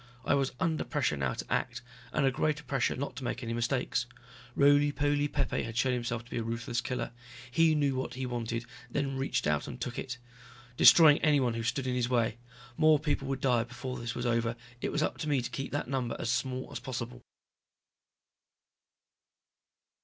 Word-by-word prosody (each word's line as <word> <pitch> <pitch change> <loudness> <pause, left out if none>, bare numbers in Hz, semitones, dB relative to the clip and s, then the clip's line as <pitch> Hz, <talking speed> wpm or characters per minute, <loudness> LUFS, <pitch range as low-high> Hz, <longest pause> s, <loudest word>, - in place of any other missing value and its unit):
I - - +3
was 135 -1 +1
under 165 -4 0
pressure 140 - 0
now 65 -3 -1
to - - -4
act. - - -1 0.3
And - - +1
under - - +5
a - - -2
greater 150 +3 0
pressure 135 -4 0
not 140 +2 -4
to 135 - -5
make 120 +1 -3
any 115 0 -3
mistakes. 120 0 0 0.5
Roly 145 +1 +5
poly 145 0 +1
Pepe - - -1
had 115 0 -5
shown 125 +1 +2
himself 120 -1 -2
to 120 - -19
be - - -1
a - - -2
ruthless 115 +1 -2
killer. 125 -2 -3 0.4
He 160 +2 +4
knew 145 -2 +2
what 130 -1 -3
he 130 0 -3
wanted 115 -1 -3 0.2
then 135 +1 -1
reached 135 +1 -1
out 75 -1 +1
and 120 - -7
took 125 -1 -4
it. 125 -2 -5 0.6
Destroying 155 +2 +8
anyone 140 -6 +3
who 115 - -3
stood 125 +4 -1
in 130 - 0
his 125 -1 0
way. 120 -2 +1 0.4
More 155 -1 +6
people 145 -2 -1
would 135 -1 -2
die 120 -4 +3
before 125 +2 -6
this 115 0 -4
was 120 - -3
over, 115 -1 +1 0.3
it - - -1
was 150 - +1
up - - -2
to 155 - -2
me 140 -2 +3
to 120 - -4
keep 135 - -4
that 145 - -2
number 125 -3 -1
as 120 - -1
small 130 +1 -2
as - - -4
possible. 125 -1 -5
125 Hz, 200 wpm, -30 LUFS, 120-140 Hz, 0.6 s, Destroying